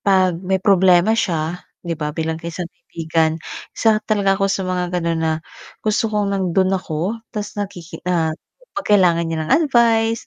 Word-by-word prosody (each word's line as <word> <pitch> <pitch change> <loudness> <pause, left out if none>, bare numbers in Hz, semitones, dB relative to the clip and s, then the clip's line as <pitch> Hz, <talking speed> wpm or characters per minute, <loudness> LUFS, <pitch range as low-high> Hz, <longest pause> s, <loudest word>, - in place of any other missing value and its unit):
'pag 185 -3 +2
may 190 +1 0
problema 190 0 +4
siya 175 -6 -1 0.3
'di 170 - -1
ba, 150 -1 -3
bilang 160 +1 -2
isang 170 +1 -4
kaibigan 160 -1 -1 0.3
isa 215 -1 +2
talaga 200 -2 +2
ako 195 0 0
sa 190 -1 -1
mga 180 -1 -1
gano'n 165 -1 -1
na, 160 0 +2 0.5
gusto 215 +1 +1
kong 205 -2 0
nando'n 190 0 +1
ako 185 +5 -3
ta's 210 -2 -5
nakiki 195 -5 -6
ah, 160 -3 +1 0.4
'pag 295 -1 -4
kailangan 175 -3 +3
niya 165 - -2
ng - - +1 0.2
advice, 230 -2 +3
185 Hz, 165 wpm, -20 LUFS, 165-205 Hz, 0.5 s, problema